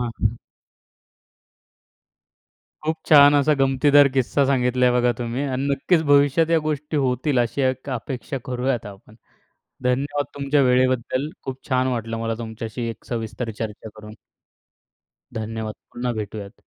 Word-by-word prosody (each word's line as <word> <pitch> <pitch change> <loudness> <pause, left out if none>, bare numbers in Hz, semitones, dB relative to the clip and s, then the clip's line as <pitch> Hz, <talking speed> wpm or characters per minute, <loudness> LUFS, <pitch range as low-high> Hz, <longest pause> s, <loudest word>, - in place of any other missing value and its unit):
हां. 115 -2 -2 2.5
खूप 160 +1 0
छान 145 -1 +8
असा 145 +1 +4
गमतीदार 140 +2 +5
किस्सा 135 +2 +2
सांगितला 125 -2 +1
आहे 125 - +4
बघा 125 0 +3
तुम्ही 120 +3 -3
आणि 135 0 -2
नक्कीच 160 +4 +2
भविष्यात 145 +3 +4
या 165 - +4
गोष्टी 150 0 -3
होतील, 130 0 +1
अशी 120 +4 -1
एक 130 +1 -1
अपेक्षा 130 +2 -4
करूयात 125 -2 -2
आपण. 100 +1 -13 0.7
धन्यवाद 140 +3 0
तुमच्या 140 +1 +1
वेळेबद्दल. 130 +2 +1
खूप 130 -1 -6
छान 130 0 +2
वाटलं 115 -2 -3
मला 115 0 -2
तुमच्याशी 115 +1 -5
एक 115 - -9
सविस्तर 115 0 -4
चर्चा 110 0 -5
करून. 105 0 -10 1.2
धन्यवाद. 110 -1 -4 0.2
पुन्हा 120 0 -2
भेटूयात. 105 -1 -7
130 Hz, 130 wpm, -22 LUFS, 115-140 Hz, 2.5 s, छान